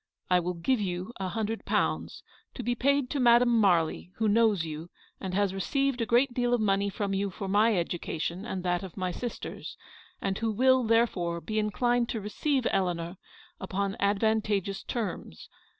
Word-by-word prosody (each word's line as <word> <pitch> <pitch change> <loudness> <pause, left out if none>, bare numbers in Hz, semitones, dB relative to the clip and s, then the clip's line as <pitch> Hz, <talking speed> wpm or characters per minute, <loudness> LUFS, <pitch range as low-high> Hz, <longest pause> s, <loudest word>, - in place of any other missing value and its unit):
I 180 - +6
will 180 +1 -3
give 215 +8 0
you 185 +3 -3
a 190 -1 -2
hundred 220 +2 -3
pounds, - - -1 0.3
to 250 - -5
be 245 +2 0
paid 280 +2 +2
to 285 - -1
Madame 240 -1 +5
Marly, 180 -6 +2
who 220 - 0
knows 210 -5 +3
you, 160 +2 -6 0.3
and 185 -1 -4
has 200 -1 +1
received 260 - 0
a 230 - -1
great 245 +2 +3
deal 245 0 +2
of - - -2
money 200 -1 +1
from 200 0 -2
you 200 +1 0
for 195 +1 -6
my 210 +2 +3
education 170 +1 -3
and 190 -5 -4
that 175 -1 0
of 190 -2 -9
my 185 -1 -1
sisters, 240 +6 -6 0.4
and 195 0 -2
who 225 -1 0
will, 260 +3 +4
therefore, 220 -7 +1
be 215 +5 -2
inclined 240 +3 +1
to 225 - -2
receive 255 +6 -1
Eleanor 175 -2 -1 0.4
upon 195 +1 -2
advantageous 205 -1 +1
terms. 190 - -5
205 Hz, 175 wpm, -28 LUFS, 185-235 Hz, 0.4 s, I